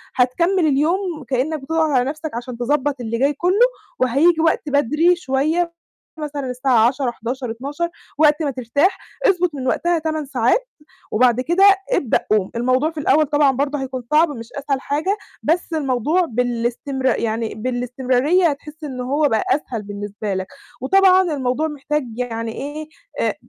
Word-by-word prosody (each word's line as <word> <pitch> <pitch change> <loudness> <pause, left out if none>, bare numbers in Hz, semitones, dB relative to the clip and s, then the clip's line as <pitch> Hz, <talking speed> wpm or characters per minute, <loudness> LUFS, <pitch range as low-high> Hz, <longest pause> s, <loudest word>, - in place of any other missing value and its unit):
هتكمل 335 +8 +2
اليوم 320 +3 0
كأنك 275 +5 0
بتضغط 320 +3 0
على 260 -4 +3
نَفسك 310 +1 -5
عشان 240 0 -6
تضبّط 280 +3 0
اللي 230 0 -3
جاي 280 +3 +2
كُلّه، 370 - +3 0.3
وهييجي 300 +7 +3
وقت 320 -2 +1
بدري 300 +6 +3
شوية، 325 +3 0 0.5
مثلًا 290 -3 -4
الساعة 250 -2 +3
22:00، 260 0 -1
23:00، 240 +1 -5
00:00 285 +8 -4 0.3
وقت 300 +1 +4
ما 285 - 0
ترتاح، 280 - +1 0.3
اضبط 360 -4 +2
من 260 -2 -4
وقتها 345 +5 +1
8 315 -1 -2
ساعات، 270 - +1 0.4
وبعد 245 +2 +3
كده 345 +8 +3 0.3
ابدأ 255 - +2
قوم، 205 -3 +2
الموضوع 255 +6 +1
في 320 - -7
الأول 305 +1 +3
طبعًا 290 -1 +3
برضه 280 +2 -1
هيكون 260 -1 -5
صعب 310 +2 +5
مش 230 -3 -8
أسهل 280 -1 -2
حاجة، 320 +9 -1 0.3
بس 335 +2 0
الموضوع 300 +4 +1
بالاستمرار 245 +1 -1
يعني 225 -1 -2
بالاستمرارية 255 - +1
هتحِس 300 +2 -7
إن 260 -4 -5
هو 285 +4 +1
بقى 220 -3 +1
أسهل 255 -6 -1
بالنسبة 205 0 -5
لك، 190 0 -3 0.3
وطبعًا 375 +5 +5
الموضوع 265 +3 -1
محتاج 300 0 -2
يعني 230 -2 -3
إيه، 300 +4 -6 0.3
آآ، - - 0
280 Hz, 155 wpm, -20 LUFS, 250-315 Hz, 0.5 s, صعب